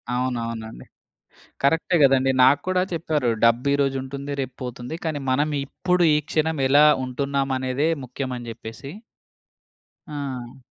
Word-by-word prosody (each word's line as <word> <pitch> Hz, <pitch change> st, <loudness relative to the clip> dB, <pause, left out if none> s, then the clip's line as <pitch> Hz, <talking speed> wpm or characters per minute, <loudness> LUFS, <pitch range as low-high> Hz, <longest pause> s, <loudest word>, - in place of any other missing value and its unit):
అవునవునండి. 115 Hz, -, -4 dB, 0.8 s
కరెక్టే 160 Hz, +5 st, +2 dB
గదండీ. 135 Hz, -1 st, +4 dB
నాకు 135 Hz, +2 st, +5 dB
కూడా 185 Hz, 0 st, +2 dB
చెప్పారు. 155 Hz, -6 st, 0 dB
"డబ్బు 115 Hz, +3 st, +4 dB
ఈరోజుంటుంది 140 Hz, 0 st, -2 dB
రేపు 130 Hz, -1 st, -6 dB
పోతుంది. 125 Hz, +3 st, -6 dB
కానీ 155 Hz, -3 st, -2 dB
మనం 145 Hz, +4 st, +1 dB, 0.2 s
ఇప్పుడు, 180 Hz, +5 st, 0 dB
ఈ -, -, +4 dB
క్షణం 160 Hz, -1 st, 0 dB
ఎలా 145 Hz, +3 st, +6 dB, 0.2 s
ఉంటున్నామనేదే 135 Hz, +1 st, -1 dB, 0.2 s
ముఖ్యం" 130 Hz, +1 st, -5 dB
అని 120 Hz, -1 st, -9 dB
జెప్పేసి. 115 Hz, +4 st, -9 dB, 1.2 s
ఆ! 135 Hz, -5 st, -6 dB
135 Hz, 120 wpm, -23 LUFS, 125-145 Hz, 1.2 s, ఎలా